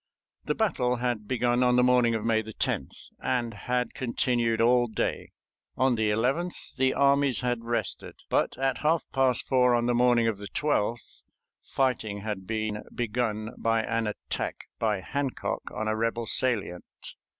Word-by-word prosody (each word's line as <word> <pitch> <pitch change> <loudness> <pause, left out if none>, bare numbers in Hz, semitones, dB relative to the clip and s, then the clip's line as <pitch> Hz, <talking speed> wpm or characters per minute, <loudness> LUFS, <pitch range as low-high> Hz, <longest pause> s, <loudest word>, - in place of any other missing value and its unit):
The - - 0
battle 130 - +1
had 120 -4 -2
begun 120 0 +1
on 125 -1 +4
the 125 - +5
morning 125 -2 +4
of 110 0 -3
May 110 -1 +2
10th, 110 -1 -4
and 120 -2 -1
had 125 +4 -2
continued 120 -2 0
all 120 +1 +4
day. 110 - -2 0.5
On 130 -1 +3
the 110 -2 +1
11th 130 +12 -1
the 130 -1 +2
armies 140 -1 +3
had 120 -2 -1
rested, 115 -5 -3
but - - 0
at 135 0 0
half 160 +2 +2
past 130 -2 +2
four 125 -2 +4
on 120 0 +1
the 120 - +2
morning 120 -1 +4
of 110 -3 -1
the 100 - -6
12th 120 -7 -2 0.4
fighting 110 -6 -1
had 100 -3 -5
been 110 -1 -2
begun 110 -2 -2
by 115 0 +1
an 115 -1 -1
attack 105 - -4
by 105 -4 0
Hancock 140 +5 -3
on 110 - -3
a 110 - +1
rebel 115 +1 -1
salient. 105 -8 -1
120 Hz, 160 wpm, -27 LUFS, 110-125 Hz, 0.5 s, the